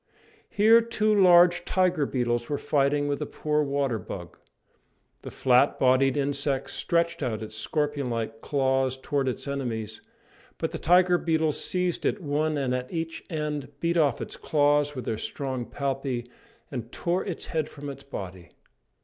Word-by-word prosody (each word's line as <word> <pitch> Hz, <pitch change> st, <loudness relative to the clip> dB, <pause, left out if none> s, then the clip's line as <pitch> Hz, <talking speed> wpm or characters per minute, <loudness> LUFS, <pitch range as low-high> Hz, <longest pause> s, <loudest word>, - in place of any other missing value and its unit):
Here 225 Hz, +3 st, +6 dB
two 220 Hz, -2 st, +1 dB
large 175 Hz, -3 st, +6 dB
tiger 180 Hz, -6 st, +1 dB
beetles 120 Hz, -2 st, -1 dB
were 145 Hz, -, 0 dB
fighting 145 Hz, 0 st, +1 dB
with 145 Hz, +1 st, -2 dB
a 150 Hz, -, -2 dB
poor 150 Hz, 0 st, -1 dB
water 140 Hz, -5 st, 0 dB
bug. 90 Hz, -2 st, -8 dB, 0.9 s
The -, -, -7 dB
flat 130 Hz, +2 st, +3 dB
bodied 130 Hz, +1 st, +3 dB
insect 140 Hz, -1 st, -1 dB
stretched 170 Hz, -1 st, 0 dB
out 110 Hz, -5 st, -2 dB
its 110 Hz, 0 st, -8 dB
scorpion 145 Hz, +2 st, -1 dB
like 115 Hz, -1 st, -3 dB
claws 135 Hz, -2 st, +1 dB
towards 135 Hz, 0 st, -1 dB
its 130 Hz, -, -5 dB
enemies, 115 Hz, -6 st, -4 dB, 0.6 s
but -, -, -2 dB
the -, -, -5 dB
tiger 180 Hz, +1 st, +4 dB
beetles 160 Hz, -2 st, 0 dB
seized 180 Hz, -1 st, -1 dB
it 210 Hz, -, 0 dB
one 155 Hz, -1 st, -1 dB
at 125 Hz, -2 st, -2 dB
each 165 Hz, -1 st, -4 dB
end, 150 Hz, -4 st, -3 dB
beat 170 Hz, 0 st, 0 dB
off 155 Hz, -5 st, +2 dB
its -, -, -6 dB
claws 145 Hz, -1 st, +2 dB
with 130 Hz, -, -5 dB
their 110 Hz, -, -2 dB
strong 130 Hz, -2 st, -4 dB
palpi, 135 Hz, -3 st, -3 dB, 0.5 s
and 120 Hz, -3 st, -5 dB
tore 175 Hz, +1 st, -1 dB
its 185 Hz, -5 st, -5 dB
head 155 Hz, -2 st, 0 dB
from 145 Hz, 0 st, -9 dB
its 140 Hz, -1 st, -7 dB
body. 95 Hz, -9 st, -8 dB
145 Hz, 160 wpm, -26 LUFS, 130-160 Hz, 0.9 s, Here